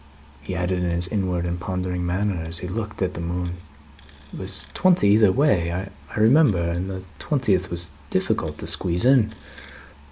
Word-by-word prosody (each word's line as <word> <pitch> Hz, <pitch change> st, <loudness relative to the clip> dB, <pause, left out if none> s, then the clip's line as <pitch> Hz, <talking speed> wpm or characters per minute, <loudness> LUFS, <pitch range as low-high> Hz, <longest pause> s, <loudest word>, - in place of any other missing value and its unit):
He 90 Hz, +5 st, -5 dB
added 90 Hz, +1 st, -1 dB
in 90 Hz, -, 0 dB
his 85 Hz, +1 st, +1 dB
inward 90 Hz, -4 st, -1 dB
and 85 Hz, 0 st, -2 dB
pondering 90 Hz, 0 st, -3 dB
manner, 90 Hz, +1 st, -1 dB
as 80 Hz, +1 st, -3 dB
he 90 Hz, -, -5 dB
looked 105 Hz, +1 st, -4 dB
at 95 Hz, -, -1 dB
the 85 Hz, -, -6 dB
moon, 90 Hz, +1 st, -3 dB, 0.8 s
"It -, -, -7 dB
was -, -, -4 dB
twenty 175 Hz, -, +4 dB
either 105 Hz, -1 st, +6 dB
way, 100 Hz, -, +2 dB
I 95 Hz, +4 st, -6 dB
remember, 120 Hz, -, +5 dB
and 90 Hz, +3 st, -3 dB
the 95 Hz, -1 st, -5 dB, 0.2 s
twentieth 105 Hz, -, +1 dB
was 85 Hz, -1 st, -2 dB, 0.2 s
difficult -, -, -1 dB
to -, -, -6 dB
squeeze 90 Hz, +2 st, +1 dB
in." 125 Hz, -5 st, +5 dB
90 Hz, 170 wpm, -23 LUFS, 85-105 Hz, 0.8 s, either